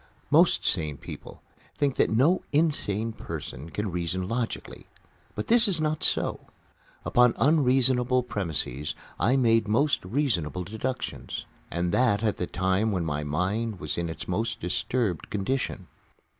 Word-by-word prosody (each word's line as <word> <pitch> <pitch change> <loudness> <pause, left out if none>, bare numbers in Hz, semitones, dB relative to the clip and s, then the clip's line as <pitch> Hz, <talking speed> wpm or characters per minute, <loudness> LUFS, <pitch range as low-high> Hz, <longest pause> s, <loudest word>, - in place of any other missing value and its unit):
Most - - +5
sane 75 -3 0
people - - -10 0.3
think 140 -2 +1
that - - +3
no 140 +12 +3
insane 115 -8 +1
person 75 - -7
can 105 +2 -3
reason 90 +1 -2
logically. 115 +2 -4 0.5
But 105 - -3
this 235 0 +4
is 185 -5 +1
not 155 0 -1
so. - - +1 0.7
Upon 125 -1 +4
unreasonable 130 -3 +4
premises 80 - -3 0.2
I 125 - +3
made 115 -3 +3
most 140 +8 +2
reasonable 90 - -1
deductions, 115 +7 -4 0.2
and 85 +1 -1
that 115 -2 +2
at 105 -2 +1
the 90 - -2
time 95 +4 +1
when 90 -4 -1
my 75 -1 -2
mind 95 +8 -1
was 75 - -3
in 85 -1 -2
its 80 - -7
most 110 +5 -1
disturbed 95 +1 -1
condition. 105 -1 -2
110 Hz, 140 wpm, -27 LUFS, 90-130 Hz, 0.7 s, Most